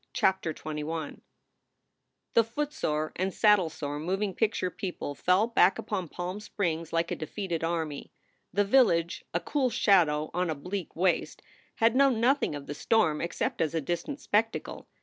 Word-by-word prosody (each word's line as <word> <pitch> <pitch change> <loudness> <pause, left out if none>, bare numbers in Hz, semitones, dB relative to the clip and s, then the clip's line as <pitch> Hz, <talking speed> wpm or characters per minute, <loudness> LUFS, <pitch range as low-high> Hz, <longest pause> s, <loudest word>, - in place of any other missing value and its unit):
CHAPTER 190 -4 +1
XXI 155 0 -5 1.1
THE 230 - +6
footsore 225 - -2
and 190 +2 0
saddlesore 165 -9 +2
moving 190 +4 -1
picture 210 -3 0
people 180 -8 -5
fell 180 +8 +3
back 230 -4 +4
upon 190 -5 -3
Palm 180 +5 -5
Springs 170 -6 -3
like 165 0 0
a - - 0
defeated 170 +1 -4
army. 160 -3 -3 0.4
The 205 +2 +2
village, 195 -8 +3
a 170 - 0
cool 265 +5 0
shadow 160 -9 +3
on 180 0 0
a 160 - -1
bleak 180 +5 -5
waste, 180 +1 0 0.3
had 225 +1 +3
known 270 -4 +4
nothing 250 - +2
of 145 -1 -7
the 145 - -5
storm 160 -2 +2
except 170 - -2
as 160 0 0
a - - +2
distant 175 - -3
spectacle. 225 -4 -1
180 Hz, 150 wpm, -28 LUFS, 160-210 Hz, 1.1 s, THE